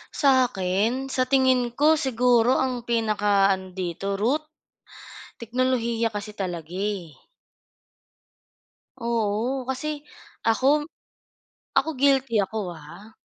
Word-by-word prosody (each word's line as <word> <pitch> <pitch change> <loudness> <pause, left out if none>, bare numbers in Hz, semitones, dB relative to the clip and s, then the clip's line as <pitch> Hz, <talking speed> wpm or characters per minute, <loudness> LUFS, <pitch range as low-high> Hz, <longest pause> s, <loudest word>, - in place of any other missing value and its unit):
Sa'kin 250 -2 +1
sa 255 -1 0
tingin 260 -2 +3
ko 305 +2 +4
siguro 245 -1 +3
ang 250 -2 -3
pinaka-ano 200 -5 +1
dito 190 +2 -3
root, 250 +10 0 1.0
teknolohiya 235 -1 0
kasi 210 0 -6
talaga 175 -3 -5
eh. 195 -6 -3 1.8
Oo, 235 +2 -1
kasi 265 +3 -3 0.5
ako 280 +7 +2 0.9
ako 315 - +3
guilty 270 -3 +3
ako 195 -3 -4
ha. 175 +9 -13
230 Hz, 90 wpm, -24 LUFS, 200-260 Hz, 1.8 s, ko